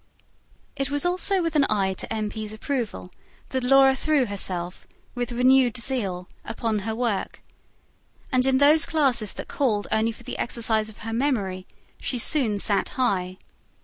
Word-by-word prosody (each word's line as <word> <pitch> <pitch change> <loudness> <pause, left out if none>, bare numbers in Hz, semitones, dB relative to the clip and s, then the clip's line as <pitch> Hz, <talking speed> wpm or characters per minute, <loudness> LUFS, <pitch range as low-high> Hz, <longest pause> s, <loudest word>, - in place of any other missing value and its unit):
It 275 -1 -2
was 290 +3 +1
also 365 +1 +1
with 330 -1 -2
an 285 -2 +4
eye 195 -3 +1
to - - -7
M. 215 -2 -2
P.'s 215 -1 -6
approval 220 - -4 0.4
that 260 -1 -2
Laura 270 +1 +5
threw 290 0 +2
herself, 185 -4 -1 0.3
with 245 -1 -3
renewed 250 0 +3
zeal, 200 -8 -2 0.2
upon 225 -1 -2
her 220 +2 -4
work. 230 -4 -2 0.9
And 255 0 +2
in 265 -1 +3
those 300 +3 +5
classes 265 - +1
that - - -7
called 245 -10 0
only 220 +1 +2
for 235 - -14
the - - -6
exercise 220 -2 0
of 215 - -14
her 225 - -4
memory, 205 -8 -1 0.3
she 255 - -3
soon 235 -4 +2
sat 200 0 +1
high. 185 -7 0
235 Hz, 160 wpm, -24 LUFS, 210-270 Hz, 0.9 s, Laura